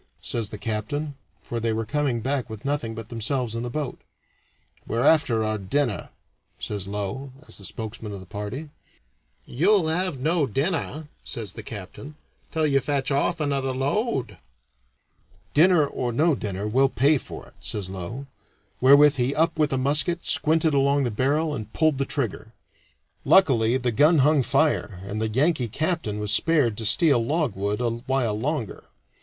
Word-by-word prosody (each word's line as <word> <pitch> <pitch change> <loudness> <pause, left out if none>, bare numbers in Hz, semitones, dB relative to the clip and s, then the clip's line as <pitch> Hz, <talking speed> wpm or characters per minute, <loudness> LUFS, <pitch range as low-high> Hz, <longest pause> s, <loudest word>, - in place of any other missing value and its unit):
says 110 +4 -2
the 105 - -7
captain, 115 +8 -3 0.3
for 120 - -4
they 115 0 0
were 110 0 -2
coming 135 -1 -1
back 130 0 -1
with 110 +1 -9
nothing 140 -6 -2
but 115 0 -8
themselves 120 +1 -2
in 115 - -3
the 120 - -4
boat. 145 0 -4 0.9
"We're 115 +2 0
after 135 -8 +4
our 110 0 -1
dinner," 120 +3 -1 0.5
says 100 -2 -4
Low, 105 +7 -4 0.2
as - - -11
spokesman 110 +1 -6
of 100 - -6
the 95 - -11
party. 105 +11 -6 0.7
"You'll 175 - +2
have 180 -1 0
no 155 +1 +1
dinner," 150 - -2 0.2
says 105 -5 -5
the 115 - -6
captain, 110 +8 -9 0.3
"until 160 -1 0
you 140 -2 +3
fetch 140 0 -1
off 155 +5 +1
another 140 -3 0
load." 135 - -1 1.1
"Dinner 165 0 +5
or 125 -3 -3
no 155 +7 +3
dinner, 105 -5 -3
we'll 135 +5 +3
pay 140 +5 +3
for - - -9
it," - - -25
says 100 -4 -4
Low, 95 +8 -6 0.6
wherewith 140 +2 +7
he 125 +2 0
up 160 0 +1
with 150 -1 +2
a 135 - +1
musket, 150 +6 +1
squinted 160 0 +2
along 140 0 +3
the 120 - -1
barrel, 145 +7 +1
and 110 -5 -6
pulled 155 -3 +2
the 135 - +1
trigger. 120 -5 -3 0.7
Luckily 130 -10 +4
the 125 -2 -1
gun 150 +8 +4
hung 150 -2 +4
fire, 115 - +1
and 105 +2 -4
the 110 - 0
Yankee 135 +2 +1
captain 155 - -2
was 105 -1 -2
spared 145 -10 +2
to 110 - -1
steal 140 -4 +4
logwood 115 - -1
a 120 - 0 0.2
while 125 -6 0
longer. 135 - -3
130 Hz, 165 wpm, -24 LUFS, 110-150 Hz, 1.1 s, wherewith